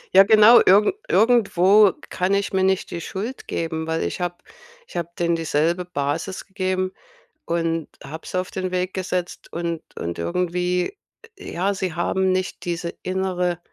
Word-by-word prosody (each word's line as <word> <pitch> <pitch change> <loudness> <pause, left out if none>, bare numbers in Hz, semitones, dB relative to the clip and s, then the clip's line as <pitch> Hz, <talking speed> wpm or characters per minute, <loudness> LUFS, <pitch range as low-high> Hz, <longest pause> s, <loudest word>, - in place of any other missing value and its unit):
Ja 195 - +11
genau, 215 +3 +7
irgend 205 - +5 0.2
irgendwo 205 -2 +5 0.2
kann 185 +2 0
ich 200 0 -1
mir 190 - +2
nicht 190 0 +1
die 170 - -4
Schuld 215 +10 -6
geben, 160 -1 -3
weil 160 0 -1
ich - - -3
habe 175 0 -2 0.5
ich - - -16
habe 170 -1 -2
denen 170 -1 +1
dieselbe 165 +2 0
Basis 160 +3 -3
gegeben 185 -1 -2 0.5
und 165 -1 -1 0.2
habe 155 +4 -8
sie 185 - -2
auf 185 - -4
den 185 -1 -4
Weg 185 0 -2
gesetzt 180 -1 -4
und 170 -1 -3
und 85 0 -4
irgendwie, 180 - -1 0.4
j 400 - -9
ja, 195 +4 0
sie 185 -3 -3
haben 190 +2 0
nicht 185 0 -2
diese 170 0 -3
innere 180 -2 -1
180 Hz, 160 wpm, -22 LUFS, 170-190 Hz, 0.5 s, Ja